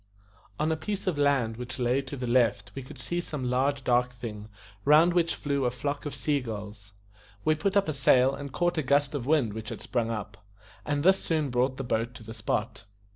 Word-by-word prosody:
On 155 +1 +1
a - - +2
piece 200 +5 -4
of 175 -6 -1
land 135 -6 +2
which 125 +1 -6
lay 125 +2 +1
to 140 +1 -7
the 125 - -3
left 120 -5 +2
we 135 - -5
could 135 +2 -11
see 170 +8 -2
some 130 -7 -4
large 135 +2 +1
dark 125 0 +2
thing, 110 -3 -7 0.3
round 155 +4 +6
which 170 -1 +2
flew 140 -2 -1
a 125 - +3
flock 140 +4 -3
of 145 - -5
sea 145 -2 0
gulls. 105 -4 -8 0.5
We 155 - +5
put 190 +6 0
up 200 - +3
a 155 - 0
sail 130 -1 +4
and 140 0 -6
caught 175 +3 0
a - - +2
gust 140 +1 +2
of 135 -4 -3
wind 140 -9 +2
which 110 0 -6
had - - -6
sprung 120 -3 -1
up, 105 -3 -5 0.4
and 145 -1 0
this 190 +2 +4
soon 155 -5 0
brought 130 +2 +1
the 135 - -3
boat 120 0 -1
to 115 - -10
the 110 +1 -8
spot. 110 +1 -3
130 Hz, 225 wpm, -28 LUFS, 120-150 Hz, 0.5 s, round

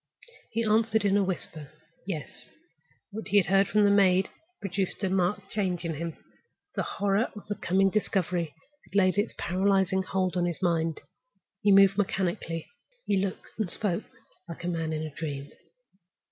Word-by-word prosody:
He 230 +1 -1
answered 220 0 +2
in 200 0 +3
a 205 - +4
whisper, 165 -5 -4 0.4
"Yes." 160 -7 -6 0.6
What 220 +2 -6
he 205 0 +3
had 195 - +5
heard 195 +1 +4
from 210 0 +3
the 200 - +5
maid 190 -2 +5
had 360 +3 -33
produced 195 0 -2
a 190 - +1
marked 190 +1 0
change 185 -4 -1
in 165 - -1
him. 165 +1 -5 0.6
The - - -1
horror 200 +3 0
of 210 - -9
the 205 - -1
coming 195 0 +2
discovery 180 -6 0 0.3
had - - -16
laid 190 0 +4
its 210 - -1
paralyzing 190 +1 +2
hold 185 -1 -1
on 175 -1 +2
his 175 -2 -2
mind. 165 -3 0 0.6
He 205 -1 +4
moved 195 0 +6
mechanically; 175 -4 -1 0.4
he 200 - +2
looked 195 -2 -4
and 210 -5 0
spoke 185 -2 -1 0.4
like 170 - -7
a - - -2
man 165 -2 -1
in 155 0 -2
a 155 -2 -6
dream. 145 -2 -5
190 Hz, 175 wpm, -28 LUFS, 170-200 Hz, 0.6 s, moved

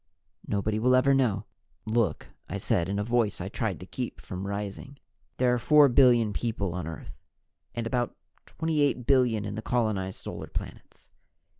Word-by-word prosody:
Nobody 105 +2 0
will 125 +3 +4
ever 135 +2 +4
know." 110 -7 +1 0.4
"Look," 110 -6 0 0.2
I 100 - -3
said 95 -3 0
in 100 - -1
a 105 - 0
voice 115 -2 +1
I 95 +1 -4
tried 105 -4 -2
to - - -7
keep 125 +5 -5
from 95 0 -6
rising. 100 +7 -5 0.4
"There 125 -1 +3
are 125 - +1
four 150 +4 +6
billion 120 -4 +5
people 100 -6 -2
on 90 -3 -4
Earth 80 -2 -9 0.5
and 115 -1 -2
about 120 0 -1 0.3
28 150 -6 0
billion 125 -6 +3
in 100 - -4
the 110 - -4
colonized 110 -6 -1
Solar - - -7
planets. - - -8
110 Hz, 165 wpm, -28 LUFS, 100-125 Hz, 0.5 s, four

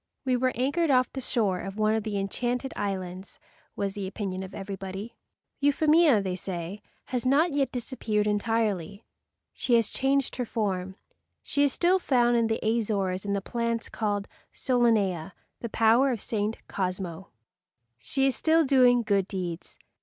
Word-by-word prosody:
"We 255 -1 +2
were 255 +1 +1
anchored 285 +7 +1
off 255 -2 +3
the 265 - -4
shore 205 -7 0
of 195 +2 -6
one 215 0 +2
of 220 - +1
the 210 -1 -3
enchanted 240 +6 -2
islands," 190 -2 -4 0.4
was 200 -1 -2
the 195 -2 -4
opinion 190 -1 -4
of 190 0 -8
everybody. 195 +2 -6 0.4
Euphemia, 295 -4 +4
they 185 -2 -2
say, 180 +1 -5 0.2
has 250 -2 -2
not 290 +6 +3
yet 280 -1 +1
disappeared 230 -4 -2
entirely. 210 -2 -1 0.5
She 245 - +2
has 230 -3 +3
changed 270 -1 0
her 250 - 0
form. 190 -4 -2 0.5
She 285 - 0
is 285 - +3
still 360 +7 +2
found 240 -7 +3
in 230 -1 +3
the 225 0 0
Azores 205 -4 0
in 200 - -1
the 200 - -1
plant 235 +2 -2
called 205 -2 -2 0.3
SOLANEA, 210 -9 +1 0.3
the 235 - -5
flower 230 +5 +4
of 240 -4 -1
St. 215 +1 -2
Cosmo. 185 -1 -4 0.7
She 270 - 0
is 270 - +2
still 320 0 +3
doing 250 -3 +5
good 200 -3 +1
deeds. 180 -4 -5
220 Hz, 160 wpm, -27 LUFS, 195-255 Hz, 0.7 s, doing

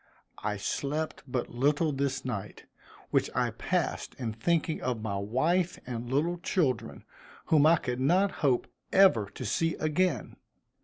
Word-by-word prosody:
I 105 -1 -2
slept 150 +9 -2
but 125 -1 -2
little 145 +6 +2
this 135 -1 -2
night, 105 -5 -5 0.5
which - - +2
I - - +1
passed - - -2
in 115 -4 -4
thinking 160 +7 0
of 120 -4 -2
my 100 -3 -2
wife 165 - +1
and 120 0 -5
little 165 +6 +1
children, 130 - -1 0.4
whom 155 -1 +5
I 165 - +7
could 125 -5 -3
not 185 +9 +3
hope 135 -5 +2 0.3
ever 185 - +5
to 125 +5 -7
see 165 +10 0
again. 155 -3 0
135 Hz, 145 wpm, -29 LUFS, 120-165 Hz, 0.5 s, I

